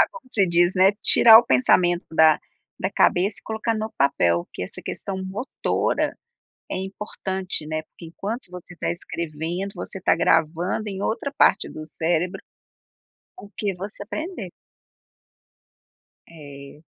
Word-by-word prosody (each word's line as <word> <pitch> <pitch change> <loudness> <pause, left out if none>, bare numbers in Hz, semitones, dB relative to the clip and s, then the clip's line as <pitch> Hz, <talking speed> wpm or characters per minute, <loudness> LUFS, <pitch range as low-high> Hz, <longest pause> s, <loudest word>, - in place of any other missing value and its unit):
desabafar, - - +6
como - - -13
você 200 -5 +2
diz, 175 +1 +3
né, 190 +1 +5
tirar 225 -1 +9
o 240 - +3
pensamento 175 +8 +3
da 160 -1 +5 0.4
da - - 0
cabeça 190 +4 +2
e - - -44
colocar 220 +1 -2
no 220 0 -4
papel, 85 -11 +2
porque - - -8
essa 90 - -7
questão 195 -1 -5
motora 205 +8 -1 0.5
é - - -3
importante, 190 -2 -4
né, 155 0 -3
porque 170 - -13
enquanto 195 +5 -6
você 180 0 -10
tá - - -2
escrevendo, 170 +2 -5
você - - -7
está 190 - +2
gravando 165 +6 +1
em 195 -1 -5
outra 275 +7 -2
parte - - +4
do 155 - -8
cérebro 170 +3 -1 1.0
o 205 - -12
que 200 -3 -2
você 200 +3 -8
aprendeu. 310 - -6 1.8
É. 145 -2 -12
180 Hz, 140 wpm, -23 LUFS, 160-200 Hz, 1.8 s, tirar